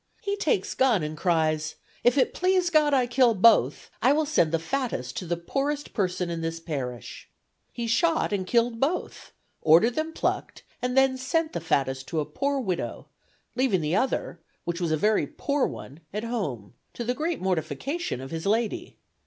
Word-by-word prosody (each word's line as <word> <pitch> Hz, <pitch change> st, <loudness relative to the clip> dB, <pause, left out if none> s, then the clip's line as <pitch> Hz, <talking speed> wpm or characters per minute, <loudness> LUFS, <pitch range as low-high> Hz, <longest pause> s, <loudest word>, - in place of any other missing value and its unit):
He 405 Hz, 0 st, -1 dB
takes 300 Hz, -, 0 dB
gun 240 Hz, -10 st, +3 dB
and 150 Hz, +1 st, -4 dB
cries, 155 Hz, -2 st, 0 dB, 0.3 s
'If 245 Hz, +3 st, +4 dB
it 260 Hz, -, +3 dB
please 365 Hz, -1 st, +2 dB
God 305 Hz, -2 st, +4 dB
I 260 Hz, -3 st, +3 dB
kill 245 Hz, -1 st, +3 dB
both, 220 Hz, +3 st, +4 dB
I 260 Hz, +4 st, +5 dB
will 310 Hz, +1 st, +1 dB
send 280 Hz, -, +2 dB
the 165 Hz, -, +2 dB
fattest 165 Hz, -, -3 dB
to 180 Hz, -, -4 dB
the 175 Hz, 0 st, -1 dB
poorest 280 Hz, -, -2 dB
person 180 Hz, -4 st, -1 dB
in 165 Hz, -1 st, -3 dB
this 165 Hz, 0 st, -3 dB
parish.' 135 Hz, -7 st, -6 dB, 0.4 s
He 235 Hz, -, -4 dB
shot, 320 Hz, +2 st, +2 dB
and 190 Hz, -2 st, -1 dB
killed 235 Hz, 0 st, +2 dB
both; 300 Hz, +8 st, -2 dB, 0.3 s
ordered 170 Hz, +10 st, +5 dB
them 315 Hz, +5 st, -2 dB
plucked, -, -, -2 dB, 0.2 s
and 250 Hz, +1 st, -1 dB
then 265 Hz, -1 st, +4 dB
sent 315 Hz, +5 st, 0 dB
the 170 Hz, -, -3 dB
fattest 135 Hz, -4 st, 0 dB
to 160 Hz, -, -2 dB
a 150 Hz, -, 0 dB
poor 280 Hz, -, -1 dB
widow, 190 Hz, -9 st, -3 dB, 0.5 s
leaving 250 Hz, -9 st, +2 dB
the 155 Hz, +3 st, 0 dB
other, 225 Hz, -7 st, -1 dB, 0.2 s
which 170 Hz, +1 st, -3 dB
was 170 Hz, -2 st, 0 dB
a 155 Hz, -, +2 dB
very 210 Hz, +7 st, +2 dB
poor 285 Hz, -1 st, 0 dB
one, 140 Hz, +4 st, -9 dB
at 210 Hz, +2 st, -3 dB
home, 150 Hz, -, -4 dB, 0.2 s
to 240 Hz, -, -3 dB
the 245 Hz, +2 st, 0 dB
great 315 Hz, +5 st, -2 dB
mortification 190 Hz, -, -2 dB
of 135 Hz, -, -8 dB
his 165 Hz, +3 st, -4 dB
lady. 220 Hz, +2 st, -1 dB
225 Hz, 185 wpm, -26 LUFS, 165-275 Hz, 0.5 s, I